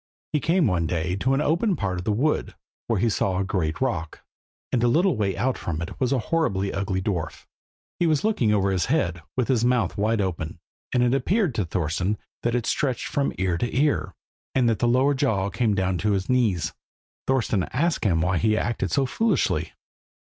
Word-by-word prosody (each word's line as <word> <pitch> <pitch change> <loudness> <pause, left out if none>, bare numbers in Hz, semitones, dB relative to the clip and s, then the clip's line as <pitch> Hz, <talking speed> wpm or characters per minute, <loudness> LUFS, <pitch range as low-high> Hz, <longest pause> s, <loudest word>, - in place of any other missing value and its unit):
He 150 - +3
came 165 +3 +2
one 85 -6 +1
day 90 +1 -1
to 130 +7 +1
an 140 - +1
open 175 +7 +1
part 95 - -2
of 90 - -7
the 110 - +1
wood, 140 +9 0 0.3
where 115 -4 +1
he 115 - +2
saw 95 -3 0
a 95 - +1
great 85 -5 -1
rock, 115 -12 -2 0.5
and 125 - +1
a 120 - +3
little 165 +6 +3
way 100 -4 -1
out 130 0 0
from 80 -3 -3
it 85 - -6
was 130 -1 +1
a 135 - +3 0.2
horribly 100 -13 +1
ugly 95 -1 -2
dwarf. 90 -6 -3 0.5
He 175 - +3
was 155 -3 +2
looking 205 - +2
over 100 -2 +2
his 95 -2 0
head, 95 - 0 0.2
with 125 - +1
his 125 -4 +2
mouth 120 -3 +1
wide 110 +2 +1
open, 90 -4 -2 0.3
and 125 -1 +2
it 125 0 +2
appeared 175 - +1
to 105 -4 -1
Thorston 90 +4 -1 0.2
that 120 0 0
it 120 -2 -1
stretched 135 -5 0
from 140 -1 0
ear 90 -3 0
to 120 - -2
ear, 140 -9 +1 0.4
and 130 -2 +3
that 115 -2 +1
the 120 - +2
lower 130 +4 +3
jaw 110 -8 0
came 105 +2 +1
down 95 -2 0
to 105 -1 +1
his 95 -1 -1
knees. 115 -10 +1 0.5
Thorston 115 -7 +1
asked 165 +2 0
him 85 -7 +2
why 90 +1 +1
he 110 0 +2
acted 120 - -1
so 140 - +2
foolishly. 225 - 0
110 Hz, 205 wpm, -24 LUFS, 95-135 Hz, 0.5 s, He